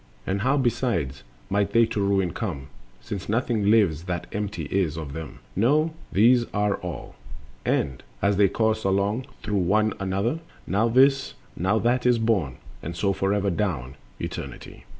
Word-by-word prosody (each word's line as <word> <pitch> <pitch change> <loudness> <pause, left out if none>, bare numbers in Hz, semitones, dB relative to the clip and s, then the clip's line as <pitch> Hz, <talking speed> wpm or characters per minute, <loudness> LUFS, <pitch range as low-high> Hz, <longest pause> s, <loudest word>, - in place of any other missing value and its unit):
And 95 +1 -1
how, 135 +5 +2
besides, 115 - 0 0.3
might 100 0 0
they 115 0 +6
to 110 -2 -2
ruin 100 -3 +1
come, 75 - -4 0.3
Since 100 -2 -6
nothing 110 -2 +1
lives 95 -7 +3
that 90 -2 -3
empty 105 -4 -3
is 90 -5 +1
of 75 -4 -6
them?— 80 -1 -7
No, 150 - +3 0.2
these 120 +4 +5
are 105 -1 +1
all, 90 -5 -7 0.5
and, 65 - 0 0.2
as 100 +5 +2
they 100 -1 +6
course 110 +1 +1
along 100 +6 0 0.2
Through 105 -1 -1
one 105 +4 +2
another, 100 +9 -1 0.3
now 105 +5 +2
this, 135 +3 +4 0.2
now 95 +5 +1
that 125 +2 +2
is 125 -1 +5
born— 100 - 0 0.2
And 85 +1 -5
so 100 +3 +1
forever 100 +1 +1
down 80 - -2 0.3
Eternity. - - -7
100 Hz, 155 wpm, -25 LUFS, 90-115 Hz, 0.5 s, they